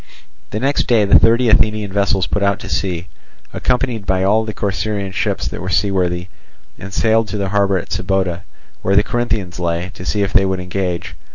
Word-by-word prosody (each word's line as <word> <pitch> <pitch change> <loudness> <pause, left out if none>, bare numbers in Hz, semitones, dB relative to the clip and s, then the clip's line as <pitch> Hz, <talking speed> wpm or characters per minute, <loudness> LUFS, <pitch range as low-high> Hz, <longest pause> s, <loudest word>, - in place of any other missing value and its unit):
The 105 - -3
next 140 +4 +1
day 115 -4 +4
the 100 - +6
thirty 115 +2 +4
Athenian 105 -2 +2
vessels 100 -2 +1
put 105 - -2
out 100 0 +2
to - - -7
sea, 90 -2 -2 0.5
accompanied 125 -4 -1
by 95 0 +1
all 105 +3 +3
the 110 - -3
Corcyraean 100 -1 -2
ships - - -1
that - - -5
were 90 - -4
seaworthy, 90 -2 0 0.5
and 95 +2 -8
sailed 110 +2 +2
to 105 - -4
the 100 -1 -1
harbour 100 -1 +2
at 90 - -6
Sybota, 95 -1 -1 0.4
where 95 - +1
the 100 - +5
Corinthians 105 -7 -2
lay, 85 +1 -2
to 90 - -9
see 100 +2 0
if 95 -1 -2
they 100 - +5
would 95 -1 -1
engage. 90 -1 -3
100 Hz, 195 wpm, -18 LUFS, 95-110 Hz, 0.5 s, the